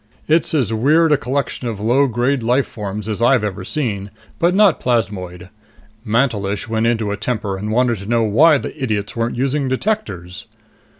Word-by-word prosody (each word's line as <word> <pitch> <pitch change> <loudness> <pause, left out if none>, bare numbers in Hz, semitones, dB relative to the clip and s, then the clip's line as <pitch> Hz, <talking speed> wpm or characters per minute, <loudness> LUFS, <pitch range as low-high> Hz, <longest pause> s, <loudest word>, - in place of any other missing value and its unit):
It's 160 +1 +2
as 125 -7 +1
weird 155 +8 +3
a - - +6
collection 135 -1 -3
of 110 -4 -4
low 125 +7 +2
grade 125 +3 0
life 125 +4 +2
forms 105 0 -6
as 110 0 -3
I've 120 -1 +4
ever 95 -3 -3
seen, 105 -5 -3 0.3
but 175 +1 +2
not 205 -4 +4
plasmoid. 95 -7 -2 0.5
Mantelish 105 -4 0
went 110 0 0
into 110 -3 0
a 100 - -3
temper 105 -2 -2
and 105 +3 -4
wanted 120 -1 +1
to 100 - -9
know 115 0 +2
why 145 +9 +5
the - - -6
idiots 105 -5 -2
weren't 115 0 -1
using 135 +2 0
detectors." 130 - -3
115 Hz, 175 wpm, -19 LUFS, 105-135 Hz, 0.5 s, a